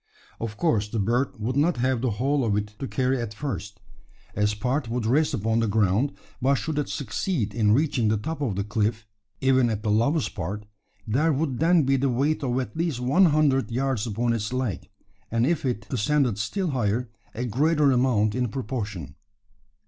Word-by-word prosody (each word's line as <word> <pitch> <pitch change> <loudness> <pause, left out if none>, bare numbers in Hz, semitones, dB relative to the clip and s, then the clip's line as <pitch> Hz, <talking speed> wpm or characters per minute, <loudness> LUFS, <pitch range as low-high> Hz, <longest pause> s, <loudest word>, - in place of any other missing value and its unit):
Of 110 -2 -5
course, 115 -12 +1
the 115 - -3
bird 120 +5 0
would 120 +4 -2
not 155 +3 +2
have 125 -1 +1
the 130 - +1
whole 135 +6 0
of 105 -3 +1
it 105 0 -2
to 135 - -3
carry 130 -1 0
at 110 -2 -5
first, 105 -6 -5 0.6
as 105 +1 +1
part 125 +4 -1
would 120 -1 -2
rest 145 +5 +2
upon 110 0 0
the 115 - +1
ground; 105 +5 +2 0.3
but 135 +3 +3
should 150 +2 -2
it 145 - -2
succeed 140 - -2
in 105 -2 +3
reaching 135 -4 +2
the 110 +1 +2
top 155 +9 -4
of 120 -9 -1
the 100 - -1
cliff 110 +1 -1 0.4
even 130 -2 +4
at 105 -2 -3
the 105 - +1
lowest 135 +8 +1
part 100 +3 -4 0.4
there 140 +9 +2
would 140 -3 -1
then 165 0 +4
be 135 0 +2
the 135 +1 +1
weight 140 +6 +1
of 125 -1 0
at 130 - -5
least 160 -6 -1
one 135 +10 +4
hundred 145 -5 +3
yards 125 -1 -1
upon 115 +2 0
its 105 -1 -2
leg; 125 -8 -3 0.4
and 115 +1 +1
if 160 0 0
it 120 -4 -2
ascended 125 -2 +1
still 175 - -1
higher, 120 -1 -1 0.2
a 120 +3 -2
greater 145 +5 +3
amount 120 -5 +2
in 125 0 0
proportion. 110 -3 -4
125 Hz, 195 wpm, -25 LUFS, 110-140 Hz, 0.6 s, even